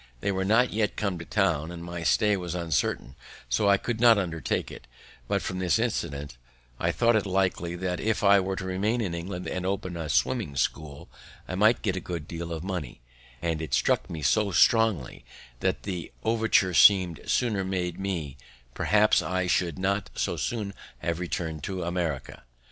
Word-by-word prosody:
They 100 - 0
were 95 0 -1
not 110 +6 +3
yet 105 -1 0
come 100 -5 -2
to 85 - -7
town, 85 -7 +1
and 85 -1 -8
my 85 0 -6
stay 105 +5 +3
was 90 -2 -4
uncertain, 80 -6 -1 0.3
so 100 - +2
I 100 - +6
could 115 +3 -3
not 120 -2 +7
undertake 85 -4 -2
it; - - -11 0.4
but, - - 0
from 95 - -3
this 90 +1 +2
incident, 75 - -3 0.4
I - - +1
thought 115 0 +3
it 105 -2 +1
likely 90 -2 0
that, 90 0 -2
if 110 -1 -1
I 100 0 +6
were 95 0 -2
to 95 - -5
remain 100 +6 0
in 100 -7 -2
England 90 +2 -5
and 90 - -3
open 95 -1 -2
a 80 -2 -4
swimming 105 - 0
school, 70 +2 -2 0.4
I - - -5
might 110 +5 +3
get 95 -4 0
a - - -2
good 85 -3 -6
deal 85 0 -6
of 80 0 -4
money; 90 -11 -5 0.4
and 80 -2 -1
it 80 - -1
struck - - +1
me 80 -3 -6
so 105 +9 +3
strongly, 110 - +2 0.4
that, - - +1
had - - -27
the 90 -4 -5
overture 110 -4 +2 0.2
been 90 -5 -3
sooner 110 -6 +1
made 90 -2 -2
me, 85 -8 -3 0.4
probably 105 +8 +3
I 95 0 0
should 90 -2 0
not 100 +2 -1
so - - -1
soon 105 -4 -3 0.2
have 85 0 -2
returned 80 -3 -3
to 95 -2 -3
America. 85 -6 -3
90 Hz, 190 wpm, -27 LUFS, 85-100 Hz, 0.4 s, not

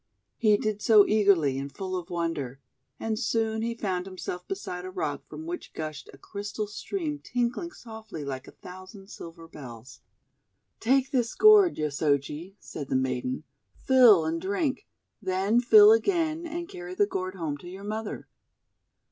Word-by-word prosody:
He 210 -2 +4
did 210 -1 -2
so 210 -2 +7
eagerly 190 -11 +3
and 140 +1 -5
full 185 +1 -5
of 180 0 -5
wonder; 165 -7 -3 0.4
and 220 -1 -2
soon 220 -1 0
he 230 +1 -2
found 185 -4 -2
himself 180 -1 -6
beside 180 -2 -5
a 185 - -6
rock 150 -7 -3
from 320 - -9
which 350 +1 -6
gushed 155 -2 -6
a - - -15
crystal 205 +7 -5
stream 300 - -4
tinkling 245 +8 -2
softly 220 - -9
like 130 -1 -5
a - - -11
thousand 185 +2 -11
silver 165 0 -10
bells. 125 -3 -11 0.8
"Take 265 +3 +2
this 245 -5 0
gourd, 425 -4 +7
Yosoji," 150 +4 -1
said 145 -3 -8
the - - 0
maiden, 130 +1 -1 0.3
"fill 240 -10 +6
and 165 +1 -2
drink. 255 - -1 0.3
Then 195 +4 +1
fill 415 - +8
again, 335 -6 +1
and 340 +1 -5
carry 180 - -8
the 205 - +4
gourd 185 -1 -4
home 160 -5 -3
to 175 - -11
your 190 +2 -9
mother." 215 +1 -5
195 Hz, 155 wpm, -27 LUFS, 165-230 Hz, 0.8 s, fill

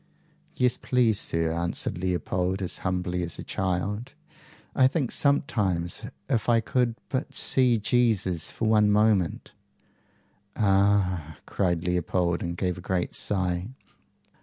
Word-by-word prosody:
"Yes, 125 -1 +2
please, 120 -5 +2
sir," 80 0 0
answered 85 +1 -2
Leopold, 90 +1 -1
as 90 - -3
humbly 90 -1 -2
as 85 -1 -2
a - - -6
child. 100 +7 -3 0.6
"I 130 -2 +6
think 135 -2 -1
sometimes, 100 - 0 0.3
if 120 -4 0
I 115 -1 +5
could 120 0 0
but 135 -2 -3
see 125 -3 +3
Jesus 105 -7 +1
for 115 - -3
one 105 -1 +4
moment 105 -4 +2 0.6
" 100 +1 -39
"Ah!" 95 -6 +1
cried 85 -4 -1
Leopold, 90 -1 0
and 85 0 -4
gave 90 -1 -2
a - - -9
great 90 0 -2
sigh. 90 -2 -1
95 Hz, 130 wpm, -26 LUFS, 90-115 Hz, 0.6 s, I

